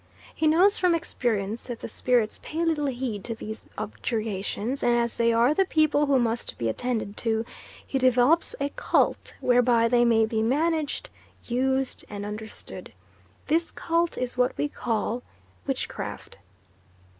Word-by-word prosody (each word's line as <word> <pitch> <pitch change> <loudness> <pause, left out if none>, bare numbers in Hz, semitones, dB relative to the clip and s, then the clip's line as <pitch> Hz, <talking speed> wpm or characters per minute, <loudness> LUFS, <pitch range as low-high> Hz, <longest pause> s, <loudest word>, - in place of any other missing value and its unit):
He 315 - +1
knows 360 +6 +5
from 360 -2 +3
experience 230 - -2
that 240 -2 -6
the - - -4
spirits 235 -1 +1
pay 330 +2 -2
little 305 -3 +1
heed 240 -6 -3
to 230 - -3
these 220 0 -7
objurgations, 215 +2 -3
and 240 0 +3
as 235 -1 0
they 235 0 +3
are 235 +5 +4
the 385 - +3
people 310 -3 +2
who 275 -1 +4
must 235 -1 -1
be 115 -1 -1
attended 220 - -2
to, 225 -1 0 0.4
he 270 - -1
develops 255 +6 +3
a 280 0 0
cult - - 0
whereby 245 -2 +4
they 240 0 +4
may 225 -2 +4
be 220 0 -1
managed, 310 - 0 0.4
used, 265 +2 0
and 205 -1 -5
understood. 210 +1 -7 0.5
This 330 +2 +1
cult 335 0 -1
is 250 -1 -3
what 250 0 +1
we 295 - +1
call 235 -3 -2 0.5
witchcraft. - - -4
245 Hz, 150 wpm, -26 LUFS, 225-290 Hz, 0.5 s, knows